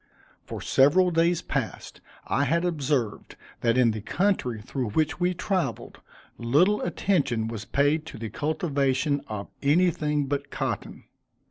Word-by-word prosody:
For - - -7
several 180 +7 +4
days 170 +1 +2
past, - - -4 0.2
I 140 - +1
had 170 +5 +1
observed 140 -9 -1 0.2
that 115 +1 +2
in 120 -3 +5
the 110 -1 -5
country 145 - 0
through 125 +2 -4
which 155 +10 0
we 180 0 +1
traveled, 185 - -2 0.4
little 155 - +3
attention 145 - 0
was 115 -2 -6
paid 150 +3 +1
to 140 - -8
the 110 -2 -6
cultivation 145 -2 0
of 105 -2 -6
anything 150 -1 +2
but 140 +1 -3
cotton. - - -4
145 Hz, 135 wpm, -26 LUFS, 125-170 Hz, 0.4 s, in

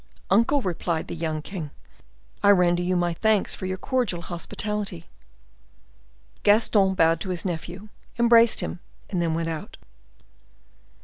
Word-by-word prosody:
"Uncle," 235 +7 +3
replied 170 -2 -2
the - - -6
young 155 -2 -3
king, 170 -6 -6 0.7
"I 200 - +4
render 175 -3 +4
you 180 +1 0
my 175 -1 +1
thanks 215 +3 +2
for 185 - -6
your 185 0 -3
cordial 210 -6 -1
hospitality." 185 +1 -4 1.4
Gaston 205 -2 +3
bowed 165 -1 +3
to 190 - -4
his 180 -1 -3
nephew, 180 +4 -5 0.3
embraced 235 -1 +5
him, 175 - -5 0.3
and 180 -3 0
then 165 -2 0
went 165 0 -2
out. 160 -2 -6
180 Hz, 135 wpm, -25 LUFS, 170-210 Hz, 1.4 s, embraced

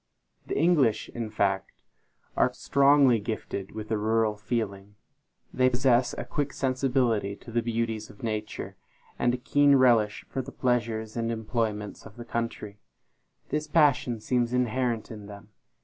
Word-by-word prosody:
The - - -2
English, 145 -8 +3
in 115 -2 -5
fact, 100 -2 -1 0.5
are - - +3
strongly 140 -3 +4
gifted 100 -2 -5
with 110 -1 -6
the 110 -1 0
rural 110 0 +1
feeling. 105 -2 -4 0.6
They 130 0 +4
possess 125 -1 +2
a - - -4
quick 145 -2 -2
sensibility 125 -6 0
to 115 - -13
the 120 +1 +1
beauties 115 -2 -2
of 105 - -15
nature, 110 -1 -4 0.4
and 120 - +3
a - - -5
keen 145 +3 +4
relish 120 -5 +3
for 135 - -3
the 135 +2 -9
pleasures 115 -4 -1
and 115 -1 -1
employments 110 -2 -3
of 105 - -16
the 120 - -8
country. 115 -3 -4 0.7
This 150 0 -2
passion 145 -7 +3
seems 120 +2 0
inherent 125 -2 0
in 105 -2 -9
them. 100 0 -11
115 Hz, 150 wpm, -27 LUFS, 110-130 Hz, 0.7 s, strongly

